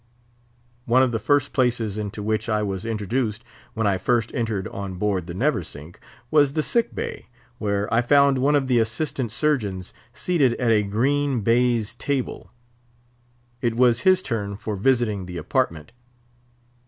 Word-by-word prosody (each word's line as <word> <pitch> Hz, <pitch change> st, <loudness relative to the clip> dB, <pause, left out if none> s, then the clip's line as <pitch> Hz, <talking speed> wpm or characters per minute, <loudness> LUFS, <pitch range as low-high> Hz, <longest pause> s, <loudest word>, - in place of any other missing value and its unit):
One 125 Hz, +3 st, +4 dB
of 130 Hz, -, +1 dB
the 115 Hz, -, -1 dB
first 145 Hz, +5 st, +1 dB
places 120 Hz, -5 st, 0 dB
into 105 Hz, 0 st, -5 dB
which 110 Hz, +1 st, -1 dB
I 105 Hz, -1 st, +1 dB
was 95 Hz, 0 st, -3 dB
introduced 110 Hz, +1 st, -2 dB, 0.3 s
when 115 Hz, -1 st, -1 dB
I 95 Hz, -2 st, +1 dB
first 120 Hz, +3 st, 0 dB
entered 110 Hz, -6 st, -2 dB
on 100 Hz, -2 st, -6 dB
board 95 Hz, -2 st, -1 dB
the 85 Hz, -, -6 dB
Neversink 75 Hz, -2 st, -3 dB, 0.3 s
was 145 Hz, -3 st, +4 dB
the 155 Hz, 0 st, 0 dB
sick 235 Hz, +7 st, 0 dB
bay, -, -, -5 dB, 0.3 s
where 100 Hz, -1 st, -1 dB
I 115 Hz, -, +4 dB
found 140 Hz, +1 st, +4 dB
one 145 Hz, +3 st, +3 dB
of 140 Hz, -2 st, +2 dB
the 125 Hz, -2 st, +2 dB
Assistant 115 Hz, +1 st, -1 dB
Surgeons 110 Hz, -, -1 dB, 0.2 s
seated 140 Hz, -4 st, +1 dB
at 120 Hz, -3 st, +1 dB
a 110 Hz, -2 st, +4 dB
green 130 Hz, +5 st, 0 dB
baize 115 Hz, 0 st, +2 dB
table. 140 Hz, -3 st, -3 dB, 1.1 s
It 120 Hz, -2 st, 0 dB
was 120 Hz, -1 st, +4 dB
his 185 Hz, +2 st, +4 dB
turn 100 Hz, -4 st, -3 dB
for 105 Hz, 0 st, -4 dB
visiting 105 Hz, -3 st, +1 dB
the 90 Hz, -1 st, -6 dB
apartment. 80 Hz, +1 st, -1 dB
115 Hz, 155 wpm, -23 LUFS, 100-130 Hz, 1.1 s, One